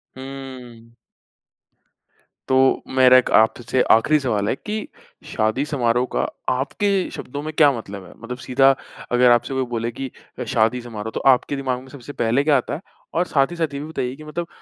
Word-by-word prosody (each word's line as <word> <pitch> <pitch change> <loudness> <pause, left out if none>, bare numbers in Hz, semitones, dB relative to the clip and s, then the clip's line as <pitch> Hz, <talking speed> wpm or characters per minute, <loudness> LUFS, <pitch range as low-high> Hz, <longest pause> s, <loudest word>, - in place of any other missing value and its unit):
हुँ। 130 -3 -10 1.6
तो, 130 0 +3 0.2
मेरा 130 0 +8 0.2
आपसे 120 +3 +2
आखरी 150 +7 +4
सवाल 105 -6 -1
है - - +1
कि 215 +7 -5 0.4
शादी 110 +6 0
समारोह 125 -4 +1
का - - +1 0.3
आपके 140 +10 -1 0.2
शब्दों 145 +3 -6
में 155 - -4
क्या 150 -2 +5
मतलब 100 -3 -8
है? - - -14
मतलब 125 +2 -7
सीधा 135 +1 +5 0.4
अगर 125 0 +5
आपसे 120 +3 +2
कोई 130 -1 0
बोले 115 +1 -2
कि 130 +2 -6 0.4
शादी 115 +2 +2
समारोह, 110 -2 -6
तो - - -1
आपके 135 +1 +3
दिमाग 130 -2 -2
में 130 - -15
सबसे 140 +3 -10
पहले 120 +5 +2
क्या 145 -2 +4
आता 125 - -3
है, 165 - -8 0.3
और 175 +2 +1
साथ 140 +2 +2
ही - - -6
साथ 160 -4 -2
ये 140 - -4
भी 150 - -6
बताइए 130 -5 -3
कि 155 - -12
मतलब 170 +3 -5
130 Hz, 180 wpm, -21 LUFS, 120-140 Hz, 1.6 s, मेरा